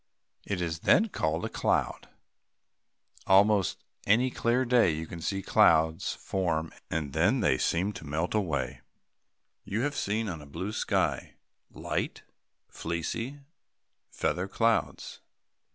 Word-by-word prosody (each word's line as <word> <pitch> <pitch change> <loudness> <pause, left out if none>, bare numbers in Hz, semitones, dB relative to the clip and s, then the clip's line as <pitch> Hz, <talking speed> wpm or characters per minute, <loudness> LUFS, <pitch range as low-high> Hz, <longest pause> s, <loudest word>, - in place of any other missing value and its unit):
It 100 -3 -2
is 80 -2 -2
then 220 - +4
called 80 - -1
a - - -1
cloud. - - -1 1.2
Almost 100 -1 +4 0.2
any 120 +5 +4
clear 120 +3 +1
day 120 -5 +4
you 80 0 -3
may 85 - -8
see 95 +4 -2
clouds 80 -1 +3
form 80 -4 -2 0.2
and 75 -4 -3
then - - +2
seem 95 +5 0
to 80 - -9
melt 80 +4 -2
away. 70 - -1 0.8
You 110 +4 -2
have 145 +2 -1
seen 110 +2 -1
on 85 -6 -5
a 75 - -12
blue 95 +8 -5
sky, 110 - -1 0.3
light, - - -4 0.4
fleecy 115 - -4 0.7
feather 90 +2 -1
clouds. 110 -3 0
95 Hz, 120 wpm, -29 LUFS, 80-110 Hz, 1.2 s, then